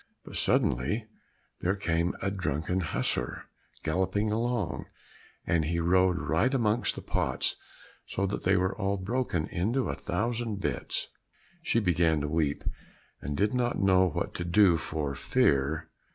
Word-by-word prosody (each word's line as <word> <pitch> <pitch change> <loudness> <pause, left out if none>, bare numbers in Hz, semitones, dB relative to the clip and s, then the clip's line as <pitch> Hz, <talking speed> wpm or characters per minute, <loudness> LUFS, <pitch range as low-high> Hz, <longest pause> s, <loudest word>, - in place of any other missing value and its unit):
But - - -9
suddenly 105 - +1 0.5
there 95 +3 +1
came 85 -2 0
a 100 - +1
drunken 90 -1 -1
hussar 65 -6 -2 0.4
galloping 95 +6 0
along, 115 -5 -1 0.6
and 85 -2 +2
he 85 +3 -1
rode 90 +1 +3
right 90 +12 +1
amongst 120 -3 +1
the - - -7
pots - - 0 0.5
so 100 - -1
that 100 - -2
they 95 +1 +3
were 95 +1 +1
all 100 -2 0
broken 95 -4 -1
into 115 +9 0
a - - -1
thousand 115 -2 -2
bits. - - -2 0.5
She - - +1
began 85 -3 +2
to 75 - -1
weep, 75 -2 0 0.6
and 70 +1 -3
did 105 +3 +2
now 125 -1 +1
know 95 -1 +4
what - - -3
to 90 - -3
do 90 0 +5
for 75 -3 -3
fear. 70 +3 +1
95 Hz, 145 wpm, -29 LUFS, 80-105 Hz, 0.6 s, do